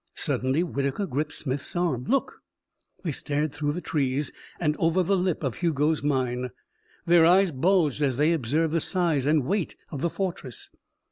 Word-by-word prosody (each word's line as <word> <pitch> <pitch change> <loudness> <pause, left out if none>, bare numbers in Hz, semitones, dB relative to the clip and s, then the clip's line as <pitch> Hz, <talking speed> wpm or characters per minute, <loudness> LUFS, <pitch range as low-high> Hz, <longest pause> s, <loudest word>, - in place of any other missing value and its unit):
Suddenly 130 +6 0
Whitaker 140 +2 -2
gripped 150 -1 -2
Smith's 135 +3 -4
arm. 165 -9 0
"Look!" 270 +1 0 0.6
They 170 - -1
stared 145 +1 -1
through 145 0 -1
the 175 - -4
trees 140 -3 -1 0.3
and 150 -3 +1
over 165 +3 +2
the 195 +3 +2
lip 180 -3 0
of 135 -4 -2
Hugo's 155 -2 +1
mine. 125 -3 0 0.6
Their 170 -1 +6
eyes 185 +2 +5
bulged 155 0 +2
as 135 -4 +1
they 155 +4 +3
observed 155 +3 0
the 165 - +2
size 165 -8 0
and 150 -3 +3
weight 195 +3 -1 0.2
of 140 - -5
the 170 - +1
fortress. 170 - -5
150 Hz, 165 wpm, -26 LUFS, 140-175 Hz, 0.6 s, Their